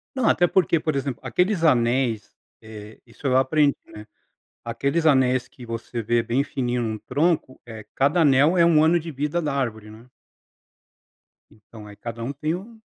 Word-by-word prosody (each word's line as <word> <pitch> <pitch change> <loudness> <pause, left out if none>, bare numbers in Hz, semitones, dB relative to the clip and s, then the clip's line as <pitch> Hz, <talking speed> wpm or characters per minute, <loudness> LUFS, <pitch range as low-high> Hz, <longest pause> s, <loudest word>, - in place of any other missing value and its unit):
Não, 260 -4 +2
até 175 - +3
porque, 175 -2 +2
por 155 -1 -2
exemplo, 135 -2 -3
aqueles 180 - 0
anéis 120 -5 +1 0.3
eh, 110 0 -12
isso 115 +4 -17
eu 130 -2 +2
aprendi, 140 +2 +3
né, 105 0 -12 0.6
aqueles 140 +7 -1
anéis 130 -4 +3
que 125 -1 -14
você 115 +1 -5
vê 120 +2 +1
bem 120 +4 0
fininho 125 -3 -3
num 110 -1 -3
tronco, 145 +4 -1
eh, 110 -2 -10
cada 145 +6 +2
anel 145 +4 +4
é 170 - +5
um 160 -2 +4
ano 165 +2 +4
de 165 0 -7
vida 150 +5 -2
da 150 -2 -2
árvore, 110 -6 -3
né. 110 +3 -14 1.5
Então 105 0 -15
aí 105 - -12
cada 115 +2 -8
tem 155 +4 -2
um 220 +5 -11
130 Hz, 170 wpm, -23 LUFS, 115-155 Hz, 1.5 s, é